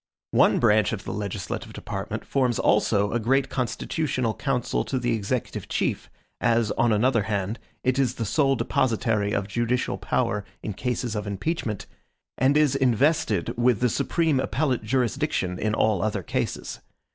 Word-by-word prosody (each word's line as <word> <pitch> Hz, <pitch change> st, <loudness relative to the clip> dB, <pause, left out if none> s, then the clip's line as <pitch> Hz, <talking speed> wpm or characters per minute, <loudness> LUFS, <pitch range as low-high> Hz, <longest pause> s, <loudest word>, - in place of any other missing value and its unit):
One -, -, +4 dB
branch 110 Hz, -3 st, +3 dB
of 105 Hz, -, -4 dB
the -, -, -5 dB
legislative 100 Hz, -4 st, -4 dB
department -, -, -5 dB
forms 125 Hz, -4 st, +1 dB
also 105 Hz, -1 st, +2 dB
a 120 Hz, -, 0 dB
great 135 Hz, +4 st, +2 dB
constitutional 130 Hz, -1 st, -1 dB
council 125 Hz, -2 st, -1 dB
to 135 Hz, -, -2 dB
the 120 Hz, -1 st, 0 dB
executive 110 Hz, +3 st, -3 dB
chief, -, -, -1 dB, 0.3 s
as, 115 Hz, -2 st, +2 dB
on 120 Hz, -, +2 dB
another 115 Hz, +2 st, +3 dB
hand, 100 Hz, +2 st, -2 dB, 0.2 s
it 130 Hz, +1 st, +1 dB
is 125 Hz, -2 st, +1 dB
the 115 Hz, -, -3 dB
sole 135 Hz, +5 st, +2 dB
depositary 110 Hz, -5 st, 0 dB
of 100 Hz, -1 st, -1 dB
judicial 120 Hz, +4 st, -1 dB
power 105 Hz, 0 st, 0 dB, 0.2 s
in 105 Hz, -, -3 dB
cases 120 Hz, +1 st, -2 dB
of 105 Hz, 0 st, -3 dB
impeachment, 105 Hz, -, -3 dB, 0.5 s
and 135 Hz, +3 st, +4 dB
is 150 Hz, -3 st, +3 dB
invested 135 Hz, +4 st, +2 dB
with 120 Hz, -2 st, +3 dB
the 125 Hz, -, +2 dB
supreme 160 Hz, +3 st, +1 dB
appellate 130 Hz, +1 st, 0 dB
jurisdiction 125 Hz, -4 st, -1 dB
in 105 Hz, 0 st, 0 dB
all 105 Hz, -5 st, +2 dB
other 105 Hz, -2 st, -1 dB
cases. -, -, -3 dB
120 Hz, 155 wpm, -25 LUFS, 105-130 Hz, 0.5 s, One